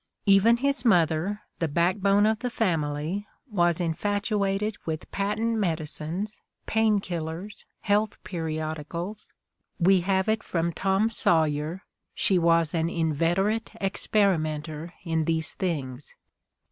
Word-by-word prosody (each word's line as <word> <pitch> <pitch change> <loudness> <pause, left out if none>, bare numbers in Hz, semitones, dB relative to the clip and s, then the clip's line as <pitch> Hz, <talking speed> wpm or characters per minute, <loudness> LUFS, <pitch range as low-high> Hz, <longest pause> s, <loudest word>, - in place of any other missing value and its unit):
Even 205 +4 +5
his 275 0 0
mother, 180 0 +2 0.2
the 165 - +1
backbone 190 +6 +3
of 220 0 +2
the 250 - -2
family, 165 -3 -1 0.2
was 175 -4 +2
infatuated 205 +3 0
with 160 -1 -5
patent 220 +3 0
medicines, 165 +3 -3
' - - -60
' - - -48
pain 220 -2 +2
killers, 175 +2 -6
' - - -56
' - - -54
health 210 +1 +2
periodicals 160 +3 -4 0.3
— - - -52
^we 185 +1 +5
have 190 +2 +1
it 220 0 +1
from 170 -1 -1
"Tom 195 +5 +1
Sawyer" 160 -1 +1 0.2
— - - -57
"she 190 -2 +3
was 165 -1 +3
an 165 -1 +1
inveterate 170 +7 0
experi 195 -2 +2
menter 155 +1 -5
in 165 -3 0
these 160 -1 0
things." 140 -7 -4
180 Hz, 135 wpm, -26 LUFS, 160-205 Hz, 0.3 s, Even